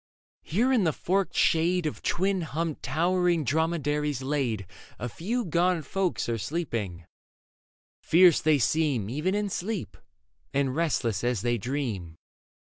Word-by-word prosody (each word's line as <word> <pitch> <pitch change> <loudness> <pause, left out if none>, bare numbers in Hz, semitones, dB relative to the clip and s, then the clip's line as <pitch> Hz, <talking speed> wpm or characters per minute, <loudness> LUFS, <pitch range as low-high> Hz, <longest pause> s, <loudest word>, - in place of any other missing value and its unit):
Here 235 - +1
in 235 -6 +3
the 160 -3 +2
forked 190 +5 -1
shade 170 +2 +2
Of 150 - -3
twin 190 +1 0
humped 160 0 -3
towering 175 +3 +1
dromedaries 150 -1 0
laid, 130 -8 -1 0.3
A 120 - -4
few 220 - -2
gaunt 170 -1 +1
folk 190 +3 -1
are 115 -1 -1
sleeping: 105 - -3 1.0
fierce 175 -1 +5
they 155 -1 +4
seem 135 -5 +1
Even 160 +9 0
in 210 0 0
sleep, 200 +1 -4 0.6
and 135 -2 +1
restless 125 - 0
as 120 -5 0
they 120 -1 +1
dream. 110 - -3
155 Hz, 130 wpm, -27 LUFS, 125-180 Hz, 1.0 s, fierce